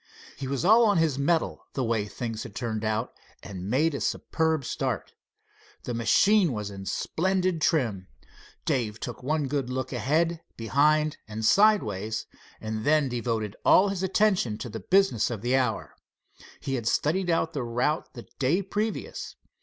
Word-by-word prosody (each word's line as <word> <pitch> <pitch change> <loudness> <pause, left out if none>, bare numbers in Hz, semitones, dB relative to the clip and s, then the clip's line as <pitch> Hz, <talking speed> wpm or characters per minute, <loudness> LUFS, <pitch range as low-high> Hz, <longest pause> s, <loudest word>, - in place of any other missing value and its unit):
He 135 - -6
was 140 +4 -2
all 225 +5 +7
on 205 - +3
his 155 -4 +1
mettle, 160 +4 0
the 135 - -1
way 115 -3 0
things 115 0 -5
had 115 -5 -9
turned 110 -3 -3
out, 110 +2 -1 0.3
and 95 -1 -7
made 150 +7 +2
a 140 - -4
superb 160 -4 0
start. 125 - -3 0.7
The 120 - -4
machine 170 - +3
was 105 -2 -4
in 95 -1 -8
splendid 185 -1 0
trim. 115 - +1 0.6
Dave 115 -7 -1
took 120 0 -6
one 150 +2 0
good 135 -2 -2
look 130 +1 -3
ahead, 160 +6 0 0.2
behind 150 +6 +2
and 110 0 -4
sideways, 110 - +3 0.3
and 110 0 -4
then 150 -1 +3
devoted 115 -4 -2
all 200 +2 +6
his 195 -2 -3
attention 190 - +1
to 120 - -6
the 110 +1 -6
business 190 - +2
of 115 -3 -5
the 125 +2 +2
hour. 125 -4 -1 0.6
He 135 - -4
had 120 -4 -2
studied 175 +8 +1
out 165 -1 +1
the 145 - -2
route 125 +6 -1
the 120 - -9
day 155 +9 +2
previous. 210 +3 -4
130 Hz, 160 wpm, -27 LUFS, 115-165 Hz, 0.7 s, all